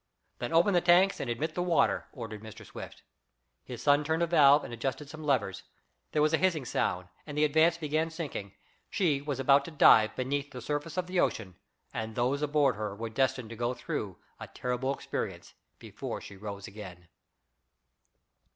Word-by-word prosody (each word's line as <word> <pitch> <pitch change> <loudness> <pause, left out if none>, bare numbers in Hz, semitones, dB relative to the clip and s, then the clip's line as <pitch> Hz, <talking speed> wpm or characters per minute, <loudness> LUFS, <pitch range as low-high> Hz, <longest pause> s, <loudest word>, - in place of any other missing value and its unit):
"Then 120 - -3
open 170 +5 +4
the 175 - +4
tanks 180 +3 +4
and 130 - -3
admit 120 +7 -2
the 180 - -2
water," 170 -5 +2
ordered 110 -4 -7
Mr. 110 -2 -11
Swift. - - -10 0.6
His 125 -1 -8
son 145 0 +4
turned 160 +3 0
a - - +4
valve 150 -4 +6
and - - -7
adjusted 135 +5 -3
some 155 0 -9
levers. 105 -10 0 0.5
There 150 - +2
was 155 +1 +2
a 160 - +3
hissing 170 -7 +1
sound, 90 -5 -1 0.2
and 145 -1 -6
the 150 - +3
Advance 160 +3 +3
began 155 0 -1
sinking. 150 - -6 0.3
She 155 -8 +1
was 145 -2 -4
about 140 +1 +5
to - - -6
dive 110 -8 +6
beneath 140 +2 -2
the 125 - -8
surface 145 +5 -4
of 180 - 0
the 180 0 -1
ocean, 100 - 0 0.4
and 110 0 -4
those 130 +4 0
aboard 145 -5 +2
her 105 -2 -4
were 115 +1 -5
destined 125 -1 0
to - - -6
go 120 +2 -1
through - - -4 0.2
a - - -7
terrible 125 +2 -2
experience 140 - -5 0.2
before - - -6
she 100 - -11
rose 100 0 -7
again. 95 -4 -10
140 Hz, 185 wpm, -30 LUFS, 115-155 Hz, 0.6 s, valve